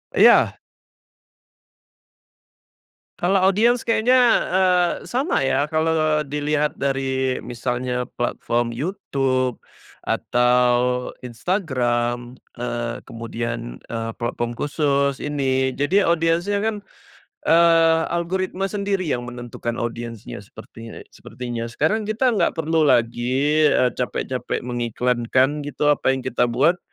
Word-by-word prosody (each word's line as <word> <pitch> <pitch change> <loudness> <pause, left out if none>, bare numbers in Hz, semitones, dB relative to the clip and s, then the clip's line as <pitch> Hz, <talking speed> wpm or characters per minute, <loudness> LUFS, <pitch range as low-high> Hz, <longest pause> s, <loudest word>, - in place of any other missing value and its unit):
Iya. - - +6 2.6
Kalau 190 +3 +2
audiens 220 +6 +4
kayaknya, 235 +2 +3 0.3
eee, 180 -2 +3
sama 270 +8 -1
ya, 145 +2 +1
kalau 155 -1 +1
dilihat 150 +1 -1
dari 135 -1 0
misalnya 125 0 -3
platform 120 -1 -1
YouTube 130 - -1 0.4
atau 125 0 +1
Instagram, 120 - -1 0.2
eee, 120 -1 -4
kemudian, 115 +1 -5
eee, 115 -1 -4
platform 120 0 -3
khusus 140 -2 0
ini, 135 -2 0
jadi 170 +6 +2
audiensnya 170 +4 +1
kan, 210 0 -2 0.6
eee, 165 -1 +5
algoritma 185 +3 -2
sendiri 200 -2 -1
yang 125 -7 -2
menentukan 120 -1 -5
audiensnya 115 -2 -5
sepertinya 115 +2 -11
sepertinya 120 -2 -6
sekarang 205 - -1
kita 235 +4 +1
nggak 215 - +1
perlu 160 -1 +1
lagi, 130 +7 +2
e 125 -3 +3
capek-capek 125 0 -3
mengiklankan 125 +3 0
gitu, 145 +1 0
apa 135 -2 +1
yang 130 - -6
kita 125 -1 +1
buat, 140 +9 +2
135 Hz, 100 wpm, -22 LUFS, 120-165 Hz, 2.6 s, Iya